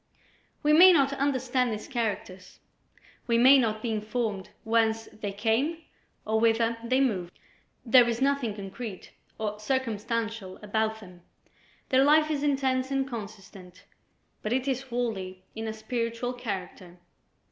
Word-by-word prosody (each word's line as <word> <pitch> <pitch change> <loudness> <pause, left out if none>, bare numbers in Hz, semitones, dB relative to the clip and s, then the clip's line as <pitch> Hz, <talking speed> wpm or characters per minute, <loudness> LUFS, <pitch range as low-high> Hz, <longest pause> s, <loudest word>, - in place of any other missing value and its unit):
We 300 +1 +4
may 360 +4 +9
not 280 -5 +3
understand 260 -2 0
his 215 -1 -5
characters, 205 -7 -4 0.7
we 235 -1 +3
may 260 +3 +7
not 215 -3 -1
be 235 - -1
informed 215 -2 -3
whence 225 0 +1
they 210 -2 -6
came 225 +10 0 0.5
or 220 +1 +1
whither 230 0 +2
they 255 +3 +1
move; 200 -10 0 0.6
there 240 0 +6
is 235 0 -2
nothing 270 -5 0
concrete 200 0 -8 0.3
or 210 -1 -3
circumstantial 225 -4 -2
about 220 +1 -1
them; 180 -3 -14 0.7
their 260 0 +4
life 305 +2 +4
is 290 -2 -1
intense 265 -2 0
and 270 -1 0
consistent, 200 -6 -10 0.6
but 215 - -3
it 260 +2 0
is 265 -1 0
wholly 220 -8 -4
in 220 0 -4
a - - -2
spiritual 230 +2 -3
character. 190 -6 -6
230 Hz, 135 wpm, -27 LUFS, 210-260 Hz, 0.7 s, may